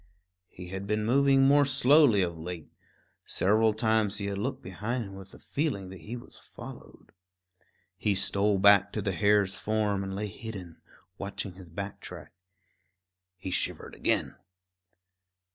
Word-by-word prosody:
He 90 0 -10
had 95 +1 -5
been 105 +1 0
moving 135 +3 +4
more 145 +1 +6
slowly 140 -5 +5
of 85 -1 -2
late; 80 -1 -7 0.5
several 110 +3 +2
times 110 -2 +1
he 100 - -3
had 100 -1 -2
looked 130 +6 -3
behind 115 +7 -3
him 100 - -10
with 95 0 -10
the - - -14
feeling 135 - -2
that 95 -1 -10
he 110 +9 -7
was 120 - -13
followed. - - -12 0.9
He 105 -2 +1
stole 100 +1 +2
back 100 0 +6
to 105 - -2
the 95 - 0
hare's 100 +2 +3
form 105 -2 0
and 95 0 -5
lay 105 +2 -2
hidden, 100 -5 -8 0.4
watching 100 -1 -5
his 90 -2 -12
back 100 +4 -6
track. - - -10 1.0
He 95 0 -6
shivered - - -2
again. - - -1
100 Hz, 150 wpm, -29 LUFS, 95-110 Hz, 1.0 s, more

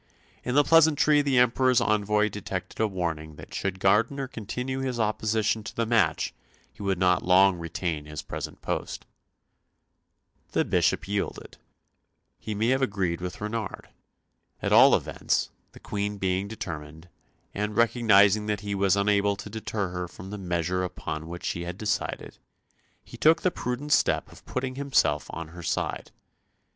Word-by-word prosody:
In 125 - -2
the 145 - +6
pleasantry 155 -2 +5
the 140 -3 +1
Emperor's 125 +1 +4
envoy 105 -2 +2
detected 95 -3 -6
a 110 - +3
warning 85 -5 -4
that - - -12
should 95 -1 -3
Gardiner 115 +8 +2
continue 125 +3 -4
his 130 -2 -2
opposition 110 0 0
to - - -8
the 115 - 0
match 115 0 +1 0.4
he - - -13
would 100 -2 0
not 90 -1 +3
long 95 0 +5
retain 85 -2 -3
his 75 -1 -6
present - - -7
post. - - -4 1.5
The - - +2
Bishop - - +1
yielded. 100 0 -4 0.8
He 110 - -5
may 110 +3 +1
have 130 +1 +2
agreed 95 -8 -1
with 90 0 -5
Renard. 105 -1 -4 0.7
At - - -1
all - - +8
events, - - -1 0.2
the - - -13
Queen 105 0 -3
being 95 0 -1
determined, 80 -6 -7 0.5
and 105 +1 -3
recognising 110 -3 +4
that 105 -1 -1
he 100 -1 -3
was 100 -1 +2
unable 100 0 +2
to 105 - -9
deter 105 -3 -3
her 90 0 -4
from 95 +3 -11
the 105 - -6
measure 90 0 -1
upon 80 -3 -5
which 90 +1 -7
she 85 - -2
had 90 +1 -5
decided, 105 0 -3 0.6
he - - -12
took 160 +2 +4
the 185 - +3
prudent 130 +1 -4
step - - +2
of - - -16
putting 130 0 -3
himself 130 - +1
on 85 -1 -6
her 85 +1 -10
side. 80 - -2
105 Hz, 155 wpm, -27 LUFS, 90-115 Hz, 1.5 s, all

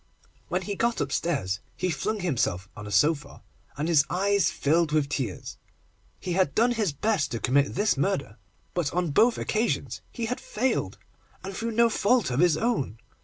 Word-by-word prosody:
When - - -1
he 205 - -3
got 235 +4 0
upstairs, 135 - -1 0.2
he 185 -1 0
flung 210 +8 -2
himself 115 - -1
on 105 -1 -8
a - - -7
sofa, 145 +9 +1 0.3
and 150 +3 -1
his 160 -4 +5
eyes 195 -2 +2
filled 160 +2 +1
with 150 -2 +1
tears. 125 -9 -4 0.6
He 180 - -3
had 180 -5 +1
done 235 +3 +4
his 215 -7 0
best 155 -1 0
to 115 - -2
commit 140 +4 +2
this 205 -4 +2
murder, 140 - -1 0.4
but 170 -5 -1
on 175 -3 0
both 230 +11 +4
occasions 225 +2 -1
he 235 - -3
had 245 +3 -3
failed, 255 +5 -1 0.5
and 190 0 -6
through 230 +2 -3
no 235 +1 +5
fault 225 - +2
of 125 - 0
his 170 -2 +4
own. 220 - -1
175 Hz, 175 wpm, -26 LUFS, 140-215 Hz, 0.6 s, his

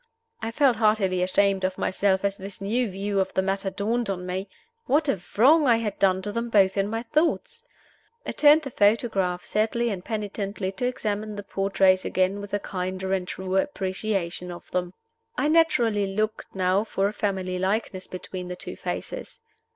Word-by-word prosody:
I 225 - -2
felt 255 -1 +3
heartily 210 -4 +2
ashamed 195 +1 +2
of 185 0 -1
myself 190 0 +1
as 200 0 0
this 195 0 -9
new 225 +4 0
view 195 +1 -2
of 190 - 0
the 190 - +2
matter 195 0 -1
dawned 215 +4 -1
on 180 -2 -3
me. 190 +2 -4 0.4
What 295 +3 +3
a 200 -10 0 0.2
wrong 290 +6 +6
I 235 - +6
had 215 -3 -3
done 190 -1 +3
to 205 - -2
them 235 +2 -3
both 195 -4 +4
in 195 0 +1
my 225 +2 -3
thoughts! 330 - 0 0.6
I - - -2
turned 300 +1 +5
the 270 - -6
photograph, 205 -5 +1
sadly 225 +3 0
and 185 -3 -5
penitently, 205 -3 -3
to 220 +6 -2
examine 215 -3 -3
the 205 - -6
portraits 195 -1 +2
again 185 +2 0
with 200 -1 -8
a - - 0
kinder 185 0 -3
and 185 -2 -1
truer 190 +1 0
appreciation 190 -7 -3
of 175 - -11
them. 180 0 -2 0.4
I 290 - +2
naturally 240 -11 +3
looked 215 +1 -1
now 185 +2 +2
for 195 -3 0
a 205 - -3
family 190 -3 -2
likeness 190 0 -1
between 185 0 -7
the 180 - -5
two - - -7
faces. - - -6
200 Hz, 180 wpm, -25 LUFS, 190-225 Hz, 0.6 s, wrong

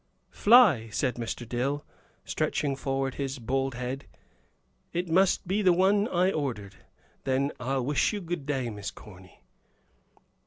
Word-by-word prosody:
"Fly," 205 - +5
said 125 +3 -1
Mr. 120 0 -5
Dill, 135 +5 -2 0.4
stretching 145 -2 -1
forward 135 0 -2
his 140 0 -4
bald 135 +2 -1
head. 125 +3 -5 0.9
"It 175 +1 -1
must 185 +2 +3
be 195 +4 +1
the 185 -3 +5
one 200 +4 +3
I 185 -1 +2
ordered. 115 - -3 0.5
Then 135 +2 0
I'll 130 0 -1
wish 145 +2 +2
you 210 - -3
good 175 -5 -5
day, 130 -5 -1
Miss 105 -1 -5
Corny." 95 -3 -15
135 Hz, 140 wpm, -28 LUFS, 125-175 Hz, 0.9 s, Fly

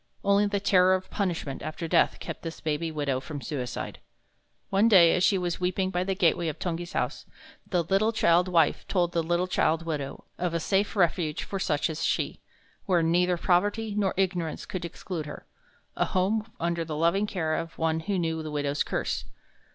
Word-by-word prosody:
Only 200 +1 +4
the 200 0 0
terror 185 -1 +4
of 185 0 -6
punishment 170 -8 -2
after 155 +2 -5
death - - +3
kept - - -6
this 165 -1 -6
baby 160 +1 -1
widow 145 -4 -1
from 145 +1 -7
suicide. 130 -5 -5 0.7
One 195 +3 +4
day 180 -7 +7
as 180 - +1
she 195 - +4
was 175 -1 -2
weeping 185 +1 0
by 180 -1 0
the 195 0 -1
gateway 170 -2 +2
of 155 - -3
Tungi's 175 0 -4
house, - - -2 0.4
the 175 -3 +1
little 195 +6 +2
child 180 -5 +3
wife 165 -4 +2
told 175 -3 +1
the 170 - +1
little 175 +2 0
child 165 -2 +1
widow 145 -4 -4
of 175 -1 -1
a - - +1
safe 195 +6 0
refuge 170 -4 +1
for 195 - -4
such 150 -6 +1
as 160 0 -4
she, - - -1 0.5
where 175 -3 +3
neither 175 +2 +2
poverty 205 +5 +1
nor 200 -3 +1
ignorance 180 -4 -1
could 185 -2 -5
exclude 170 -2 -5
her - - -9 0.5
a - - +1
home 210 +4 0
under 170 0 0
the 155 -2 -5
loving 170 +6 +2
care 160 -6 -1
of 165 +1 -4
one 160 0 +1
who 195 +4 -2
knew 160 -2 -1
the 155 - -5
widow's 145 -1 -1
curse. - - -1
175 Hz, 190 wpm, -27 LUFS, 160-190 Hz, 0.7 s, day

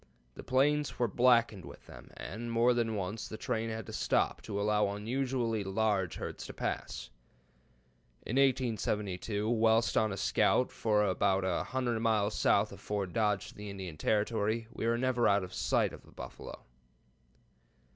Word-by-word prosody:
The - - -9
plains 145 +3 +1
were 120 - +2
blackened 115 -3 +3
with - - -12
them, - - -13
and 115 +7 -6
more 120 +2 +4
than 115 -2 0
once 100 +2 -4
the 110 - -7
train 115 +1 -2
had 110 -1 -5
to - - -9
stop - - +1
to 100 - -4
allow 105 0 +2
unusually 115 +1 -1
large 95 -2 0
herds - - -6
to - - -8
pass. - - -4 1.1
In 125 - -2
1872, 110 -6 0
whilst 115 0 +3
on 110 -1 +3
a 100 - -4
scout 125 - +2
for 105 -2 +1
about 95 0 +1
a 90 -2 0
hundred 125 -3 -1
miles 110 -2 +1
south 105 +1 +2
of 100 - -10
Fort 100 -4 -3
Dodge 105 -3 +1
to - - -13
the 105 0 -7
Indian 95 -5 -6
Territory, 110 +4 0
we 115 - -2
were 115 0 +2
never 125 -1 +2
out 100 -1 +3
of 90 - -8
sight - - +1
of - - -14
buffalo." - - -9
110 Hz, 165 wpm, -32 LUFS, 100-120 Hz, 1.1 s, more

